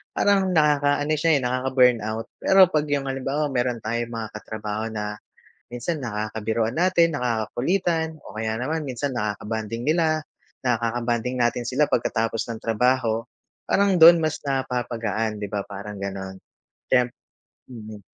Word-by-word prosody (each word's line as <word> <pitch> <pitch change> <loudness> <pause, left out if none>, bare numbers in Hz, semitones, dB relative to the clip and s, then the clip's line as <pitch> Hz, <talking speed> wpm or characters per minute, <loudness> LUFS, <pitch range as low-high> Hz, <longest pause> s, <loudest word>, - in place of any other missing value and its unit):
Parang 200 -2 +3
nakaka-ano 145 -1 +3
siya 165 +1 +3
eh, - - -2
nakaka-burnout. 125 -3 +2 0.2
Pero 190 0 +7
pag 150 -3 +1
yung 140 -1 0
halimbawa, 135 +3 -1
meron 125 -1 0
tayong 115 +2 -2
mga 115 -2 -4
katrabaho 110 0 -4
na, 105 -1 -5 0.5
minsan 125 +7 -3
nakakabiruan 110 +1 -2
natin, 170 -3 +3
nakakakulitan 155 - -1
o 105 - -11
kaya 110 0 -1
naman 155 +4 -2
minsan 130 0 -3
nakaka-bonding 110 +1 -3
nila, 155 -1 +2 0.5
nakaka-bonding 120 +1 0
natin 120 0 +1
sila 130 +5 +1
pagkatapos 115 -1 0
ng 115 -1 -5
trabaho, 115 0 +1 0.5
parang 200 -1 +3
dun 170 0 +9
mas 155 -1 0
napapagaan, 120 -5 -2
'di 105 - -3
ba? 100 0 -2
Parang 100 +1 -8
ganon. 95 -1 -5 0.5
Temp 125 -1 +3 0.6
mm. 110 -3 -9
120 Hz, 130 wpm, -24 LUFS, 110-145 Hz, 0.6 s, dun